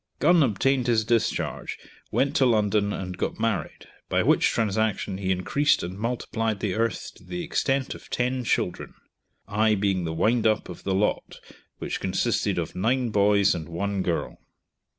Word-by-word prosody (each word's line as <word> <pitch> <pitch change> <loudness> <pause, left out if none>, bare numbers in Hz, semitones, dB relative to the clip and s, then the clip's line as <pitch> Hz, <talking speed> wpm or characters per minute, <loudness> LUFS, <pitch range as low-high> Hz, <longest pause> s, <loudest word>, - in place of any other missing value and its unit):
Gun 170 +2 +4
obtained 130 +1 +2
his 110 -3 +2
discharge, 115 0 -1 0.3
went 135 +1 0
to 135 - +4
London, 105 -2 +2
and 90 -3 -5
got - - -2
married, 105 -9 -2 0.2
by - - +2
which - - +4
transaction 105 -3 0
he 95 -1 -2
increased 140 +11 +2
and 90 +2 -5
multiplied 115 -1 -2
the 95 -2 -1
earth 115 +2 -1
to - - -18
the 175 0 -5
extent 135 -4 0
of - - -13
ten 125 +1 -1
children, - - -1 0.5
I 110 +1 +2
being 95 -2 0
the 80 - -2
wind 110 +7 +2
up 110 -1 0
of - - -8
the 95 - 0
lot, 105 +2 -1 0.4
which - - -4
consisted - - 0
of - - -3
nine 120 +5 +1
boys 100 -1 +4
and 85 -2 -6
one 100 +3 -2
girl. 85 -2 -2
110 Hz, 165 wpm, -25 LUFS, 95-120 Hz, 0.5 s, Gun